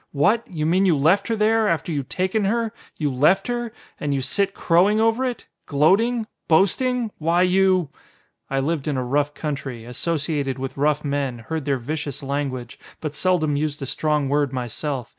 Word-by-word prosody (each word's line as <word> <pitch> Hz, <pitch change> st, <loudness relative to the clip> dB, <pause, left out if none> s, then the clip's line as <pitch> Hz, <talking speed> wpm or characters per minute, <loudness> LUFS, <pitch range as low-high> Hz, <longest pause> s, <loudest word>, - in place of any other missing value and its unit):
"What! 205 Hz, +11 st, +2 dB
You 155 Hz, -4 st, -3 dB
mean 185 Hz, +4 st, +3 dB
you 165 Hz, -5 st, +3 dB
left 180 Hz, +8 st, +3 dB
her 230 Hz, -, 0 dB
there! 220 Hz, +1 st, +3 dB
After 170 Hz, -1 st, 0 dB
you'd 140 Hz, -3 st, -3 dB
taken 190 Hz, +3 st, 0 dB
her, 230 Hz, +2 st, 0 dB, 0.2 s
you 145 Hz, -4 st, -1 dB
left 175 Hz, +10 st, +3 dB
her! 240 Hz, -1 st, -2 dB, 0.3 s
And 145 Hz, -, -2 dB
here -, -, +1 dB
you -, -, -1 dB
sit 195 Hz, +8 st, 0 dB
crowing 185 Hz, +6 st, +3 dB
over 225 Hz, +3 st, +2 dB
it! 250 Hz, -2 st, -3 dB, 0.2 s
Gloating! 215 Hz, -, +3 dB, 0.2 s
Boasting! 225 Hz, +7 st, +2 dB
Why 170 Hz, +3 st, +2 dB
you 185 Hz, -3 st, +3 dB, 0.3 s
!" -, -, -42 dB
I 135 Hz, 0 st, 0 dB
lived 155 Hz, 0 st, -2 dB
in 145 Hz, -3 st, 0 dB
a 130 Hz, -, -1 dB
rough 145 Hz, +3 st, 0 dB
country. 140 Hz, -7 st, -5 dB
Associated 145 Hz, +1 st, -2 dB
with 135 Hz, 0 st, -5 dB
rough 150 Hz, +1 st, +1 dB
men, 140 Hz, -3 st, -1 dB
heard 135 Hz, +6 st, -5 dB
their 140 Hz, -2 st, +1 dB
vicious 145 Hz, +2 st, -4 dB
language, 135 Hz, -3 st, -3 dB, 0.2 s
but 155 Hz, -2 st, -4 dB
seldom 160 Hz, -3 st, +1 dB
used 150 Hz, 0 st, -1 dB
a -, -, -2 dB
strong 150 Hz, +1 st, 0 dB
word 145 Hz, -1 st, +1 dB
myself. 125 Hz, +1 st, -3 dB
155 Hz, 185 wpm, -23 LUFS, 140-195 Hz, 0.3 s, mean